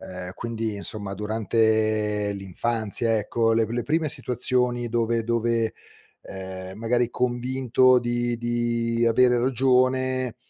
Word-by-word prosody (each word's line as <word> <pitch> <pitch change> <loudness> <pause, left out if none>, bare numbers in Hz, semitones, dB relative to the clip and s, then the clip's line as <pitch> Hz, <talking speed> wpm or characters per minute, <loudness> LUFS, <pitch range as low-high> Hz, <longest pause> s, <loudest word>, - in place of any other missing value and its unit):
ehm, 90 0 -8
quindi 115 -2 -4
insomma 100 0 0
durante 110 -1 0
l'infanzia, 110 +3 +1
ecco, 115 +2 0
le 115 0 +2
p - - -12
le 120 +1 -2
prime 160 +3 0
situazioni 125 -3 0
dove 115 0 0
dove, 115 -1 0 0.5
ehm, 95 0 -8
magari 120 +1 0
convinto 125 +1 +2
di 120 0 -2
di 120 0 -1
avere 125 +1 +4
ragione, 130 0 +1
115 Hz, 115 wpm, -24 LUFS, 110-125 Hz, 0.5 s, avere